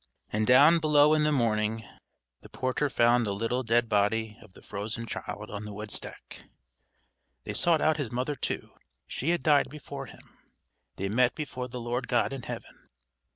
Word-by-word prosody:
And 105 +1 +1
down 145 +7 +7
below 150 -1 +5
in 155 - +3
the 150 - +2
morning 110 -4 0 0.5
the - - -15
porter 130 +3 -1
found 120 -1 +3
the 100 -3 -2
little 115 +5 -1
dead 120 0 +2
body 105 +1 +1
of 105 -4 -17
the - - -16
frozen 110 +3 -5
child 105 -1 -6
on 100 0 -5
the 105 - -7
woodstack; 105 +1 -6 1.0
they - - -5
sought 170 -3 +2
out 155 0 +3
his 140 -7 -3
mother 130 +4 -2
too.... 130 - -4 0.3
She 145 - -3
had 175 0 +1
died 150 -3 +4
before 150 -1 -8
him. - - -17 0.6
They 95 - -3
met 120 +4 +2
before 130 -5 -5
the 125 0 -7
Lord 120 +2 -3
God 125 +2 +1
in 135 - -5
heaven. - - -9
120 Hz, 175 wpm, -28 LUFS, 110-145 Hz, 1.0 s, down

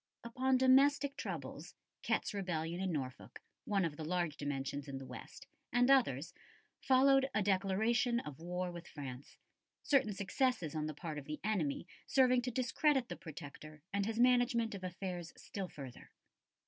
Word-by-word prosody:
Upon 255 +3 +1
domestic 275 +2 +5
troubles 165 - -6 0.3
Ket's 220 -1 0
rebellion 175 -3 -2
in 190 -1 0
Norfolk, 130 -5 -5 0.3
one 195 -3 +2
of 155 -1 -4
large 165 -1 -1
dimensions 145 0 -3
in 135 -1 -5
the 135 - -7
west, - - -10 0.3
and 245 +2 +4
others 170 - +3 0.5
followed 270 +1 +5
a 210 - +3
declaration 220 +6 +2
of 150 - -8
war 180 +1 -3
with 170 0 -9
France, 135 -2 -8 0.5
certain 265 -7 +3
successes 200 - 0
on 155 -1 -1
the 155 - -5
part 155 -1 -5
of 140 - -11
the 150 +1 -5
enemy 180 -9 0 0.2
serving 255 -2 +4
to 250 - -2
discredit 255 +2 +1
the - - -4
Protector 155 -1 -10
and 200 0 +1
his 225 0 -2
management 245 -2 +4
of 195 -2 -7
affairs 180 -2 -5
still 195 -2 -5
further. 135 -7 -10
190 Hz, 155 wpm, -35 LUFS, 155-245 Hz, 0.5 s, domestic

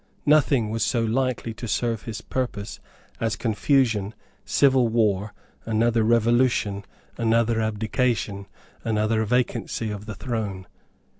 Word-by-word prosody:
Nothing 140 -7 +3
was 115 0 -2
so 120 -3 +1
likely 120 0 -1
to 120 +1 -7
serve 115 0 -1
his 110 -3 -5
purpose 115 -5 -4 0.4
as 115 -1 0
confusion, 110 -2 +1 0.3
civil 130 -3 +4
war, 110 -3 +1 0.3
another 115 +1 +1
revolution, 115 -3 +2 0.3
another 115 0 +2
abdication, 110 -1 -1 0.4
another 110 0 +1
vacancy 120 -1 -1
of 105 +1 -7
the 110 - -5
throne. 100 -4 -4
115 Hz, 115 wpm, -24 LUFS, 105-120 Hz, 0.4 s, civil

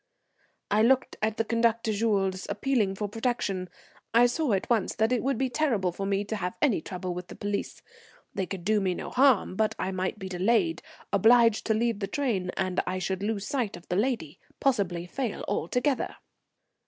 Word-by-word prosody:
I 210 +1 +4
looked 260 +3 +3
at 215 0 0
the 225 - +1
conductor 230 -1 +1
Jules, 195 -3 0
appealing 210 -2 0
for 210 +1 -3
protection. 205 -4 -2 0.5
I 240 +1 +7
saw 245 0 +1
at 190 - 0
once 225 -5 +1
that 220 +2 +1
it 250 - +2
would 270 -2 0
be 265 - +1
terrible 235 - +1
for 195 +3 -4
me 200 0 +1
to 215 +1 -4
have 180 -2 -3
any 250 - +2
trouble 180 0 -5
with 180 0 -6
the - - -10
police. 205 0 -4 0.5
They 190 - -2
could 185 -2 -6
do 215 0 +3
me 185 -2 0
no - - -6
harm, 255 -8 +4
but 215 +1 +1
I 190 - -2
might 185 +2 -2
be 190 - -6
delayed, 230 - +1 0.3
obliged 230 +2 +5
to 220 - +3
leave 230 -1 0
the 195 - -2
train, 205 -7 -1
and 185 -1 0
I 185 +1 -1
should 190 +1 -2
lose 205 -1 -2
sight 240 -8 -2
of 175 - -16
the 180 - 0
lady, 210 - -1 0.2
possibly 195 -10 +1
fail 240 +4 -4
altogether. 250 - 0
210 Hz, 190 wpm, -28 LUFS, 190-235 Hz, 0.5 s, I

